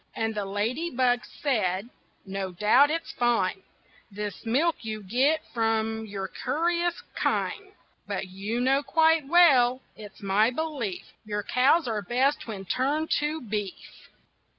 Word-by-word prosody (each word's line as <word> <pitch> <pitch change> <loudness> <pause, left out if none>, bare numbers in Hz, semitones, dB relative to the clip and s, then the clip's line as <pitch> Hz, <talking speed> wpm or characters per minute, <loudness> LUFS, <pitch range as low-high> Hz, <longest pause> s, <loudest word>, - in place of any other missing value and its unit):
And 225 0 -1
the 205 -2 -3
ladybug 245 +5 0 0.2
said: 210 -7 0 0.4
"No 195 -1 -4
doubt 215 +10 +4
it's 330 +2 -3
fine, 225 -6 0 0.5
This 210 +2 -6
milk 310 +9 +2
you 215 -1 -5
get 265 +10 +2
from 225 -1 0
your 195 -2 -4
curious 340 - -1
kine, 405 -1 -1 0.3
But - - -3
you 200 +5 -4
know 265 +3 +3
quite 320 0 +3
well 265 -7 +5
it's 210 -1 -12
my 200 +3 +3
belief 255 - -3 0.2
Your 210 -1 -3
cows 270 +7 +3
are 220 -2 -1
best 265 +8 0
when 200 -4 -6
turned 285 - -1
to 300 +2 -2
beef." 210 -5 -6
240 Hz, 130 wpm, -27 LUFS, 205-295 Hz, 0.5 s, well